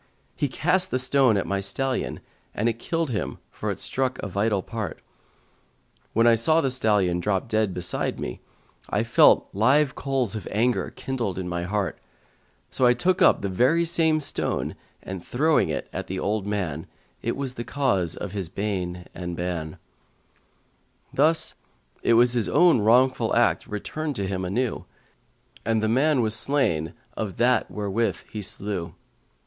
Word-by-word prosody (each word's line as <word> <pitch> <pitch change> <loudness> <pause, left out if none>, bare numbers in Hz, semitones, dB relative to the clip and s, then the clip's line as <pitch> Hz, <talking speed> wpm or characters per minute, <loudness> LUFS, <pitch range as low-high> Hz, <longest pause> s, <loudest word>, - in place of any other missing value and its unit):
He 145 - 0
cast 180 +8 +1
the - - 0
stone 130 -3 +3
at - - -1
my 100 0 -1
stallion, 125 +7 -2 0.3
and 110 - 0
it 115 0 -1
killed 165 +1 -2
him 110 - -3
for - - -4
it - - -3
struck 130 -1 -1
a - - -2
vital 100 0 0
part. 110 -7 -5 1.1
When 115 +1 +3
I 120 - +7
saw 155 +9 +4
the 135 -5 +1
stallion 105 -8 +2
drop 95 +2 -1
dead 110 -3 +1
beside 90 -1 -2
me, - - -5 0.5
I 105 - +1
felt 115 - +5
live 135 +7 +3
coals 135 -6 -1
of 110 - -5
anger 120 +4 +1
kindled 120 -9 -4
in 95 -1 -3
my 85 0 -3
heart; 100 0 -2 0.7
so 130 - +3
I 120 - +5
took 180 +8 +1
up - - +5
the - - 0
very 130 - +2
same 160 -2 +2
stone 145 -1 -1 0.3
and 95 -2 -6
throwing 155 +5 +2
it - - -3
at - - -4
the 95 - -4
old 100 +1 -1
man, 90 -5 -3 0.3
it - - -2
was 135 -2 -3
the 120 - -5
cause 120 - 0
of 100 - -6
his 95 -5 -4
bane 90 -2 -3
and 90 -1 -5
ban: 85 -3 -4 1.4
thus 155 +4 +3 0.5
his 120 -1 +4
own 175 -8 +5
wrongful 125 +5 +3
act - - +2
returned 145 +8 -4
to 100 - -2
him 95 -1 -3
anew, 120 +7 -2 0.8
and 110 0 0
the - - +2
man 135 +4 +3
was 110 -2 0
slain 110 - +1 0.2
of 105 -4 -4
that 125 0 +2
wherewith 105 +2 -1
he 105 - -5
slew. 95 -3 -3
110 Hz, 160 wpm, -25 LUFS, 95-130 Hz, 1.4 s, I